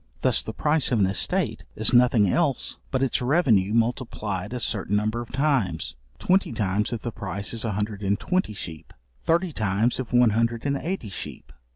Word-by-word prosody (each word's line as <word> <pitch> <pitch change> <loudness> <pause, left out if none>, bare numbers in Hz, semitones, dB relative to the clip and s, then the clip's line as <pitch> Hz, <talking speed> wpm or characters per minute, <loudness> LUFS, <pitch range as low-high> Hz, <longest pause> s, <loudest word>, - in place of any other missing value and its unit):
Thus - - +3
the - - -5
price 150 -2 0
of 120 - +3
an 100 - +4
estate 95 0 0
is 110 - +2
nothing 120 -4 +5
else 145 - 0
but 130 0 0
its 135 - +1
revenue 125 - +3
multiplied 115 -4 -1
a 125 - -3
certain 105 -3 -1
number 110 +3 0
of 120 - -9
times; 135 -7 0 0.2
twenty 190 -3 +2
times 105 -1 0
if 115 -3 -4
the 120 - -3
price 100 0 -4
is 115 - -2
a 110 - -1
hundred 105 0 -3
and 100 0 0
twenty 180 - -1
sheep; 80 -5 -8 0.3
thirty 170 - +1
times 110 +3 0
if 130 - -4
one 120 -2 +5
hundred 115 +2 0
and 140 -1 +1
eighty 165 - -4
sheep. 80 -6 -8
115 Hz, 190 wpm, -25 LUFS, 105-130 Hz, 0.3 s, nothing